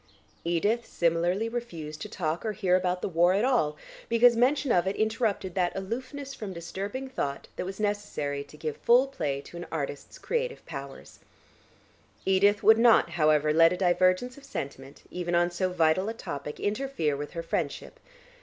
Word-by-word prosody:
Edith 205 +8 0
similarly 175 +5 +1
refused 170 -11 -6
to 210 - -5
talk 165 -5 -2
or 220 -2 -2
hear 190 -3 +2
about 180 0 0
the - - +1
war 175 0 +3
at 205 +5 +2
all, 155 - +1 0.3
because 235 +1 +5
mention 260 +3 +2
of 175 -2 +3
it 190 - 0
interrupted 215 -4 -1
that 180 -1 0
aloofness 255 +8 -5
from 205 -6 -6
disturbing 195 +9 -5
thought 140 - -4
that - - -4
was 190 +1 -7
necessary 205 -9 -2
to 150 - -15
give 155 -1 -4
full 245 +3 +5
play 150 - -3
to 170 - -11
an 175 - -7
artist's 145 -3 -5
creative 485 0 -3
powers. 135 0 -9 1.1
Dodo 195 +2 +4
would 220 0 +7
not, 230 -7 +5
however, 155 -2 +3
let 165 +2 +6
a - - -3
divergence 185 +7 +2
of - - -20
sentiment 135 - -7
even 175 -1 -2
on 175 0 +3
so 185 +1 -1
vital 180 +3 +2
a 225 - -5
topic 145 -7 -6
interfere 205 - -1
with 145 +1 -6
her 165 - -4
friendship. - - -3
185 Hz, 175 wpm, -28 LUFS, 165-225 Hz, 1.1 s, would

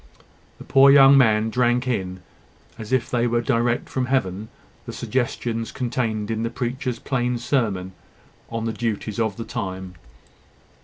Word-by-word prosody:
The - - -11
poor 135 +1 +6
young 140 0 +8
man 110 -4 +3
drank 125 +1 +1
in, 95 -6 -3 0.6
as 110 0 -8
if 130 -2 +1
they 120 -1 0
were 120 0 +1
direct 120 0 0
from 130 -2 -2
Heaven, 110 -5 -1 0.4
the - - -6
suggestions 120 -2 -2
contained 115 -4 -2
in 110 0 -2
the 115 - -1
preacher's 125 0 -3
plain 125 -1 -1
sermon 110 -7 -1 0.6
on 115 -1 -3
the 115 - -2
duties 110 -2 -3
of 110 -3 -1
the 115 - -5
time. 95 -6 -5
115 Hz, 150 wpm, -23 LUFS, 110-125 Hz, 0.6 s, young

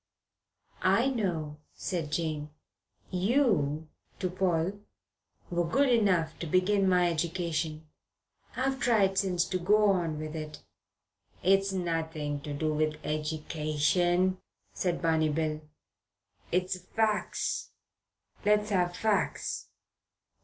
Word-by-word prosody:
"I 270 - +3
know," 165 - -2 0.2
said 165 -6 -3
Jane. 155 -2 -2 0.6
"You" 180 - +2 0.3
to 185 -2 -2
Paul 185 +1 0 0.7
"were 175 0 +1
good 270 +9 +3
enough 185 -9 +2
to 170 - -4
begin 190 +3 +3
my 180 -1 +4
education. 165 -2 -2 0.7
I've 265 +1 0
tried 200 -6 +3
since 180 -3 +1
to 185 0 -2
go 210 +3 +4
on 170 -5 0
with 155 0 -5
it." 155 -1 -7 0.8
"It's 195 +1 +4
nothing 160 -5 -2
to 145 - -6
do 155 +2 -1
with 155 0 +1
edication," 155 +4 0 0.3
said 175 -2 -1
Barney 160 -1 +3
Bill. 155 0 -1 0.9
"It's 185 +1 0
fac's. 210 +3 -1 0.7
Let's 210 0 +2
have 180 -2 +1
fac's. 215 -2 0
175 Hz, 105 wpm, -29 LUFS, 155-195 Hz, 0.9 s, my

